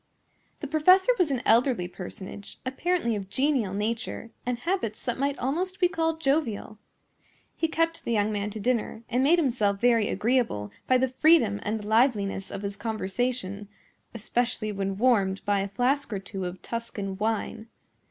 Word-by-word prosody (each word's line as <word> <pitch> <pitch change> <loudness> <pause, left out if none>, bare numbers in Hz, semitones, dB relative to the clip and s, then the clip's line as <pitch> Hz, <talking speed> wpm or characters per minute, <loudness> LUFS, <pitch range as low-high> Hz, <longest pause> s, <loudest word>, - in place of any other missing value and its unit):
The 295 - -3
professor 365 - +5
was 350 -4 +3
an 260 -3 -1
elderly 235 -6 +3
personage, 185 +2 -9
apparently 265 -2 0
of 195 -2 -5
genial 260 -5 +1
nature, 225 +2 -3 0.2
and 250 -1 0
habits 245 - -2
that 245 0 -2
might 280 +1 0
almost 360 +9 -2
be 360 - +5
called 325 -2 -1
jovial. 270 -8 -1 0.8
He 325 - 0
kept 330 +1 0
the - - -3
young 215 -1 +2
man 205 0 -2
to 215 +1 -6
dinner, 230 0 -1
and 245 +2 +1
made 320 +6 +5
himself 230 - +1
very 230 -2 +3
agreeable 225 - 0 0.2
by 255 - +5
the 260 +1 +1
freedom 255 -6 +4
and 215 0 -3
liveliness 215 -4 +2
of 200 - -6
his 200 0 -4
conversation, 215 -1 -3 0.4
especially 230 0 -1
when 195 -1 -2
warmed 200 -5 +2
by 205 -1 +2
a 195 - -1
flask 250 +7 0
or 205 - -1
two 195 -1 -6
of 180 +1 -6
Tuscan 225 -4 -4
wine. 220 +1 -2
230 Hz, 160 wpm, -27 LUFS, 205-270 Hz, 0.8 s, professor